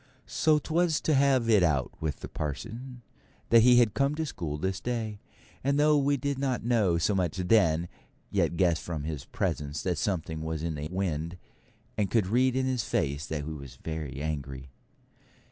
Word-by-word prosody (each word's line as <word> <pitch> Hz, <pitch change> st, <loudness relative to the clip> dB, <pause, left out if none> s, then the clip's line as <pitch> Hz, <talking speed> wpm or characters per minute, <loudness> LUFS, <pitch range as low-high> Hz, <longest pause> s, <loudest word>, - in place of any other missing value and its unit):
So 155 Hz, -1 st, +2 dB
'twas 160 Hz, +2 st, +1 dB
to 155 Hz, -, +1 dB
have 135 Hz, -3 st, +3 dB
it 110 Hz, -4 st, +5 dB
out 75 Hz, -7 st, +1 dB
with 75 Hz, -4 st, -3 dB
the -, -, -5 dB
parson 120 Hz, -, -6 dB, 0.5 s
that 115 Hz, 0 st, +8 dB
he 125 Hz, +2 st, +7 dB
had 115 Hz, -4 st, +4 dB
come 140 Hz, +2 st, +1 dB
to 160 Hz, +1 st, -2 dB
school 85 Hz, -, -4 dB
this 95 Hz, +4 st, -2 dB
day; 110 Hz, -4 st, -3 dB, 0.4 s
and 140 Hz, +2 st, +2 dB
though 150 Hz, 0 st, +5 dB
we 140 Hz, 0 st, +2 dB
did 140 Hz, +1 st, -2 dB
not 135 Hz, -3 st, -1 dB
know 110 Hz, -8 st, +3 dB
so 85 Hz, +5 st, +1 dB
much 90 Hz, -3 st, 0 dB
then, 90 Hz, -4 st, +3 dB, 0.4 s
yet 85 Hz, -, +1 dB
guessed 85 Hz, -4 st, +2 dB
from 80 Hz, -4 st, -4 dB
his 75 Hz, -3 st, -5 dB
presence 75 Hz, 0 st, -3 dB
that 90 Hz, -4 st, -1 dB
something 80 Hz, -5 st, -2 dB
was 80 Hz, 0 st, -3 dB
in 85 Hz, -1 st, -1 dB
the 75 Hz, 0 st, -5 dB
wind, 85 Hz, -2 st, -2 dB, 0.6 s
and 100 Hz, -2 st, +1 dB
could 110 Hz, -2 st, +2 dB
read 125 Hz, +6 st, +2 dB
in 130 Hz, 0 st, +1 dB
his 130 Hz, -3 st, 0 dB
face 75 Hz, -9 st, -1 dB
that 75 Hz, -2 st, -3 dB
he 80 Hz, -, -5 dB
was 70 Hz, -4 st, -8 dB
very 80 Hz, -4 st, -5 dB
angry. 70 Hz, -3 st, -5 dB
95 Hz, 185 wpm, -28 LUFS, 80-125 Hz, 0.6 s, that